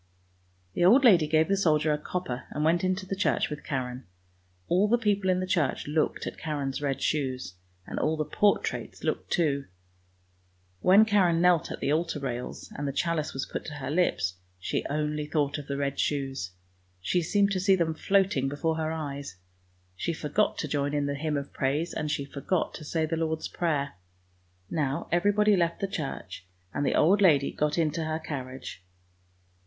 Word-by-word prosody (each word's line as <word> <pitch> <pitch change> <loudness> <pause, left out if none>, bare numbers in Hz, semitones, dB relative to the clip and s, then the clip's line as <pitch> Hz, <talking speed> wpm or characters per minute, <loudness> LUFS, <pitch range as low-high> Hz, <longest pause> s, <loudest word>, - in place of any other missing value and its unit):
The - - 0
old 235 +10 +7
lady 175 -10 +6
gave 155 +1 +3
the 195 - +2
soldier 155 -5 +2
a - - 0
copper 150 -7 -4
and 150 - -3
went 170 +2 +3
into 185 +1 0
the 195 - -3
church 190 - +1
with 150 0 -6
Karen. 125 -4 -4 0.6
All 185 +4 +3
the 235 +3 +4
people 205 -4 +1
in 185 0 +3
the 185 - -1
church 170 -7 0
looked 155 +1 0
at - - -6
Karen's 145 -3 -3
red 140 -2 -1
shoes, 130 -9 -1 0.3
and - - -4
all 155 +1 +1
the 155 - -1
portraits 205 +5 0
looked - - -2
too. 145 -5 +1 1.2
^When 200 +4 +7
Karen 190 -6 +3
knelt 175 -2 +3
at - - -6
the 145 - +1
altar 165 -1 0
rails 125 -3 -5
and 145 0 -3
the - - 0
chalice 155 +1 -1
was 135 - -2
put - - -5
to 150 - -6
her 140 -1 -4
lips, 95 - +1 0.2
she 90 - -2
only 150 0 -1
thought 150 -2 0
of 145 - -9
the 140 - -2
red 140 -1 -2
shoes; 135 -8 -1 0.5
she 175 - 0
seemed 200 +4 +2
to 190 - 0
see 190 +1 +4
them 170 -3 0
floating 190 -6 +2
before 160 +3 -1
her 160 0 -1
eyes. 140 - -5 0.6
She 170 - -2
forgot 155 +7 0
to 155 - -2
join 145 0 -1
in 145 -1 +1
the 140 - -1
hymn 150 +1 -1
of 140 0 -6
praise, 145 +6 -1
and 150 -1 -2
she 145 -2 -1
forgot 140 +6 -2
to 155 - -8
say 160 +1 0
the 165 +1 -2
Lord's 160 -1 -1
Prayer. 150 -5 -1 0.7
Now 140 -1 -1
even 195 +4 +3
body 210 0 +4
left 170 -2 0
the 195 - -1
church, 135 - -6 0.3
and 145 - -1
the - - +1
old 195 +6 +4
lady 145 -8 +5
got 150 +1 -1
into 160 0 0
her 155 0 -1
carriage. 130 - -7
155 Hz, 190 wpm, -28 LUFS, 140-175 Hz, 1.2 s, old